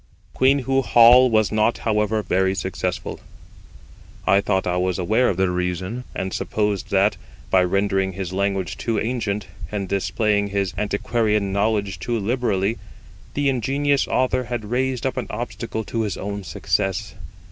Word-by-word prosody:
Queenhoo 135 0 +2
Hall 125 +1 +7
was 110 -3 +2
not, 110 +2 +2
however, 105 -1 0
very 95 +1 +1
successful. 95 -2 -3 1.1
I 100 - +4
thought 95 -2 0
I 90 0 0
was 90 -1 0
aware 110 +7 +2
of 90 - -1
the 95 -1 +2
reason, 90 +7 -3
and 95 0 -3
supposed 105 -2 -1
that, 100 +2 +2 0.3
by 95 -1 +5
rendering 95 +1 +1
his 95 -1 -5
language 95 -1 -1
too 115 -2 -1
ancient, 110 -4 -2 0.3
and 100 -2 -3
displaying 100 +2 0
his 100 -3 -1
antiquarian 105 -1 0
knowledge 100 -1 0
too 120 -1 -2
liberally, 110 -1 0 0.6
the 145 0 +1
ingenious 135 +2 +1
author 130 0 +1
had 120 -2 -4
raised 130 0 0
up 130 - -1
an 125 - -2
obstacle 115 0 -4
to 115 +2 -3
his 105 -3 -2
own 100 0 -4
success. 95 0 -1
105 Hz, 145 wpm, -22 LUFS, 95-120 Hz, 1.1 s, Hall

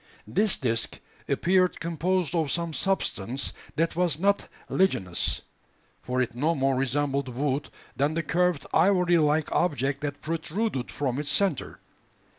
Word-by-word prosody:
This 210 -1 +4
disc 115 -3 -1 0.3
appeared 185 0 +2
composed 170 +1 -1
of 160 -4 +1
some 170 +2 -1
substance 135 - -1 0.2
that 165 +1 0
was 170 -4 +1
not 200 +2 +2 0.2
ligneous: 95 - +1 0.6
for 125 0 -2
it 125 -1 0
no 150 +7 +1
more 135 0 +1
resembled 135 +1 0
wood 135 +3 -2 0.3
than 145 +3 +1
the 165 - 0
curved 175 +1 +1
ivory 180 -3 +4
like 150 0 +2
object 140 -4 0
that 145 -1 -4
protruded 165 - -2
from 135 -2 -2
its 145 -1 -3
centre. 190 -9 0
155 Hz, 135 wpm, -27 LUFS, 135-180 Hz, 0.6 s, This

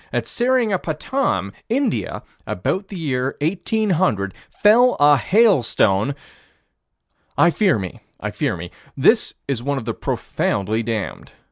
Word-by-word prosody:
At - - -1
Seringapatam, 215 - 0 0.2
India, 250 -1 -1 0.2
about 190 - -2
the 195 - -8
year 135 -5 -2
1800, 175 - 0 0.2
fell 240 +4 +4
a 145 0 +6
hailstone 135 - +2 1.2
I 170 - +5
fear 190 - +2
me, 95 -3 -6 0.2
I - - -4
fear - - -2
me: - - -8 0.3
this - - +3
is 135 -4 -2
one 140 +2 -1
of 125 - -5
the 115 - -2
profoundly 105 +2 -2
damned. 110 -3 -4
150 Hz, 120 wpm, -21 LUFS, -, 1.2 s, a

